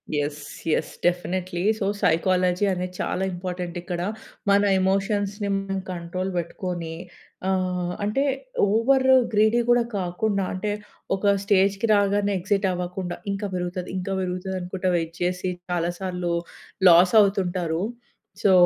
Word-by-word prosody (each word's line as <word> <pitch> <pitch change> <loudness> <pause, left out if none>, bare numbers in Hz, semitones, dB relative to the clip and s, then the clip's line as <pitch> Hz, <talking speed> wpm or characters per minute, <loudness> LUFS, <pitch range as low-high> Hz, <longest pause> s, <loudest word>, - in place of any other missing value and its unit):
Yes 145 0 -2 0.3
yes. - - 0
Definitely. 175 0 0 0.2
So 200 - 0 0.2
psychology 180 +3 +2
అనేది 180 0 -4
చాలా 190 - -1
important 180 -1 -5
ఇక్కడ. 175 0 -4 0.5
మన 200 0 +5 0.2
ఎమోషన్స్‌ని 200 +2 0
మనం 195 0 -3
కంట్రోల్ 180 +2 -4
బెట్టుకొని 175 -1 -4 0.5
ఆహ్, 180 -2 0
అంటే 210 +7 +1 0.5
ఓవర్ 260 +5 +3 0.3
గ్రీడీ 215 +3 +4
గూడా 240 0 +5
కాకుండా 195 +2 -1
అంటే 195 +3 -2 0.4
ఒక 200 +1 +3
స్టేజ్‌కి 200 +1 +2
రాగానే 205 0 +2
ఎక్సిట్ 195 +2 0
అవ్వకుండా 180 0 -3 0.2
ఇంకా 200 +1 -2
బెరుగుతాది 180 0 -3
ఇంకా 185 +1 -3
బెరుగుతది 185 +1 -3
అనుకుంట 180 +1 -5
వైట్ 165 -1 -1
చేసి 180 +1 0 0.2
చాలా 175 -1 0
సార్లు 180 -2 -2 0.6
లాసవుతుంటారు. 180 -2 +4 0.6
సో 200 - +5
185 Hz, 120 wpm, -24 LUFS, 175-200 Hz, 0.6 s, మన